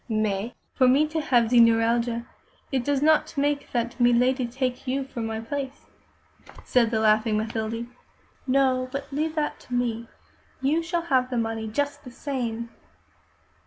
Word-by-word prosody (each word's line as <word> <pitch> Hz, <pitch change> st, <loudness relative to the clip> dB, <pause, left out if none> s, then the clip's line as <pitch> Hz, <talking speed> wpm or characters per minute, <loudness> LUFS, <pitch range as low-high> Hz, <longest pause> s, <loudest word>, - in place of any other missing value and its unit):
"Mais, 215 Hz, 0 st, -1 dB, 0.2 s
for 255 Hz, -, +4 dB
me 280 Hz, +4 st, +4 dB
to 315 Hz, +1 st, -2 dB
have 240 Hz, -6 st, +2 dB
ze 245 Hz, -, +6 dB
neuralgia, 230 Hz, +1 st, +3 dB, 0.5 s
it 260 Hz, -3 st, 0 dB
do 285 Hz, +1 st, +1 dB
not 310 Hz, -1 st, +3 dB
make 285 Hz, 0 st, 0 dB
that 240 Hz, +1 st, -2 dB
milady 245 Hz, +1 st, +3 dB
take 255 Hz, +1 st, -3 dB
you 270 Hz, +2 st, 0 dB
for 265 Hz, -2 st, -8 dB
my 225 Hz, 0 st, -3 dB
place," 270 Hz, +4 st, -5 dB, 0.8 s
said 240 Hz, -3 st, +3 dB
the 220 Hz, -1 st, 0 dB
laughing 215 Hz, 0 st, +3 dB
Mathilde. 220 Hz, +1 st, -3 dB, 0.6 s
"No, 255 Hz, -1 st, +2 dB
but 275 Hz, +1 st, -6 dB
leave 310 Hz, +3 st, -1 dB
that 300 Hz, -1 st, -1 dB
to 245 Hz, -, -6 dB
me. 235 Hz, -1 st, -1 dB, 0.5 s
You 290 Hz, +5 st, +1 dB
shall 340 Hz, 0 st, -2 dB
have 260 Hz, -6 st, +1 dB
the 250 Hz, -, -2 dB
money 225 Hz, -1 st, -2 dB
just 285 Hz, +6 st, -2 dB
the 255 Hz, -, -9 dB
same." 235 Hz, -3 st, -4 dB
250 Hz, 160 wpm, -25 LUFS, 230-275 Hz, 0.8 s, ze